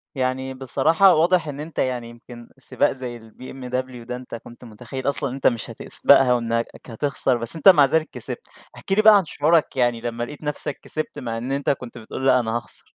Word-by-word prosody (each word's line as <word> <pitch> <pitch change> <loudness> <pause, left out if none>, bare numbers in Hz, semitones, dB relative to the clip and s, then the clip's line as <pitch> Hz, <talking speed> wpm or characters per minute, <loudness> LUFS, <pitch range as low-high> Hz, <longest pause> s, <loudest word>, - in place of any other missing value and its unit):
يعني 130 0 -2
بصراحة 155 +8 +3
واضح 170 0 +2
إن 145 0 -6
أنت 155 +1 -7
يعني 125 -3 -2
يمكن 120 0 -13
سباق 140 +2 0
زي 125 -3 -7
الBMW 125 +2 -7
ده 125 - -5
أنت 125 -1 -8
كنت 120 +2 -13
متخيّل 125 +4 -5
أصلًا 140 -1 +2
إن 130 - -6
أنت 135 - +1
مش 120 -3 -1
هتسبقها، 125 -2 +3
وإنّك 115 -1 -1 0.2
هتخسر 130 +1 +1
بس 115 +6 -3
أنت 160 +4 +6
مع 150 -6 +7
ذلك 160 +3 0
كسبت، 470 - -6 0.3
احكِ - - -11
لي 210 +2 +4
بقى 215 -1 +8
عن 190 - 0
شعورك 155 +1 +1
يعني 120 -2 +1
لمّا 120 0 -4
لقيت 150 +5 -9
نفسك 150 -1 -2
كسبت، 155 - -3
مع 115 -2 -4
إن 125 +4 -5
أنت 140 0 -1
كنت 125 -3 -3
بتقول 120 +4 -7
لا 125 -1 +5
أنا 115 -1 -2
هاخسر. 120 - -8
130 Hz, 205 wpm, -22 LUFS, 120-145 Hz, 0.3 s, بقى